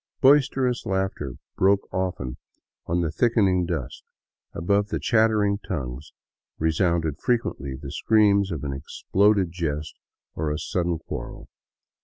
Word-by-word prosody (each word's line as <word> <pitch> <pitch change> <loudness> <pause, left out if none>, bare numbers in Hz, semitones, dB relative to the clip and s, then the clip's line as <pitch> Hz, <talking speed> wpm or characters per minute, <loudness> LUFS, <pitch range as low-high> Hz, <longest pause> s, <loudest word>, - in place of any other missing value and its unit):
Boisterous 135 -2 +4
laughter 95 -8 -2 0.2
broke 100 +1 +3
often 90 -9 -2 0.5
on 85 +1 +1
the 80 -3 -1
thickening 95 -3 +2
dusk; 80 -8 -4 0.5
above 100 +4 +1
the - - -2
chattering 110 -3 +2
tongues 70 -6 -5 0.5
resounded 80 -1 +1
frequently 115 - -1
the 70 +1 -8
screams 100 +1 +3
of 80 -5 -4
an 70 -1 -2
exploded 95 +7 +1
jest 75 -3 -3 0.4
or 80 -1 -2
a 75 - -1
sudden 85 0 -1
quarrel. 80 - -8
90 Hz, 120 wpm, -25 LUFS, 75-100 Hz, 0.5 s, Boisterous